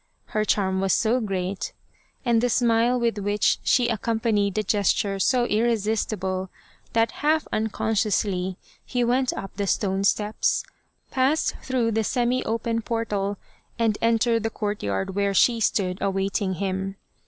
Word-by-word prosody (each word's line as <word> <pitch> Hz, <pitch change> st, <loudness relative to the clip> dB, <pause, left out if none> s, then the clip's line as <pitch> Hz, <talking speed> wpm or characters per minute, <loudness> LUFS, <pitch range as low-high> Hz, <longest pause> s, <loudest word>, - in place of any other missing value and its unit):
Her 215 Hz, -, +2 dB
charm 190 Hz, -3 st, +1 dB
was 195 Hz, -1 st, +2 dB
so 235 Hz, +3 st, +2 dB
great 195 Hz, -3 st, -3 dB, 0.5 s
and 235 Hz, -2 st, +3 dB
the 245 Hz, -, +2 dB
smile 235 Hz, +1 st, +3 dB
with 230 Hz, -3 st, 0 dB
which 205 Hz, +1 st, +1 dB
she 245 Hz, -2 st, +3 dB
accompanied 220 Hz, -3 st, 0 dB
the 215 Hz, -, +1 dB
gesture 200 Hz, 0 st, +1 dB
so 245 Hz, +4 st, +3 dB
irresistible, 210 Hz, -4 st, 0 dB, 0.4 s
that 225 Hz, 0 st, +2 dB
half 310 Hz, +1 st, +2 dB
unconsciously, 205 Hz, -4 st, 0 dB, 0.3 s
he 245 Hz, -1 st, -1 dB
went 250 Hz, +2 st, +2 dB
up 195 Hz, -, -7 dB
the 200 Hz, -1 st, -1 dB
stone 195 Hz, 0 st, 0 dB
steps, 210 Hz, +1 st, +1 dB, 0.5 s
passed 275 Hz, +4 st, +2 dB
through 250 Hz, -3 st, 0 dB
the 220 Hz, 0 st, +1 dB
semi 245 Hz, +3 st, 0 dB
open 230 Hz, 0 st, -1 dB
portal, 210 Hz, -4 st, -2 dB, 0.4 s
and 225 Hz, -3 st, +1 dB
entered 230 Hz, 0 st, +2 dB
the 225 Hz, -, -1 dB
courtyard 190 Hz, -, -3 dB
where 200 Hz, 0 st, 0 dB
she 235 Hz, +4 st, +4 dB
stood 185 Hz, -4 st, 0 dB
awaiting 195 Hz, 0 st, 0 dB
him. 190 Hz, +1 st, -3 dB
215 Hz, 140 wpm, -24 LUFS, 195-235 Hz, 0.5 s, she